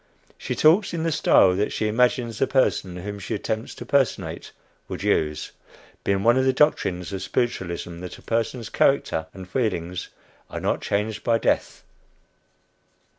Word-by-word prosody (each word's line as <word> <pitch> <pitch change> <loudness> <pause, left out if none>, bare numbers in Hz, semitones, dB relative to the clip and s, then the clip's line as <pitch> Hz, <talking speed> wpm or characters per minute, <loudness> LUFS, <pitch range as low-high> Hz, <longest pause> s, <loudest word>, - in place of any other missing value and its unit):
She - - -4
talks 175 +5 +4
in 160 - -2
the 165 - +1
style 95 -10 +5
that 105 +2 0
she 110 - -1
imagines 120 0 +1
the 135 - +2
person 95 -8 +1
whom 100 +3 -6
she 105 +3 -3
attempts 110 +2 -3
to - - -8
personate 100 - 0 0.4
would - - -6
use, 75 0 0 0.5
being 100 0 +1
one 120 +3 +5
of 130 - +3
the 130 - +4
doctrines 100 - +1
of 95 - -3
spiritualism 85 -7 -2
that 90 0 -8
a - - -17
person's 115 0 -2
character 80 -12 +1
and 95 -1 -10
feelings 90 -6 -2 0.4
are - - -5
not - - -1
changed 105 +1 -2
by 115 -1 +3
death. - - -1
105 Hz, 160 wpm, -24 LUFS, 90-125 Hz, 0.5 s, style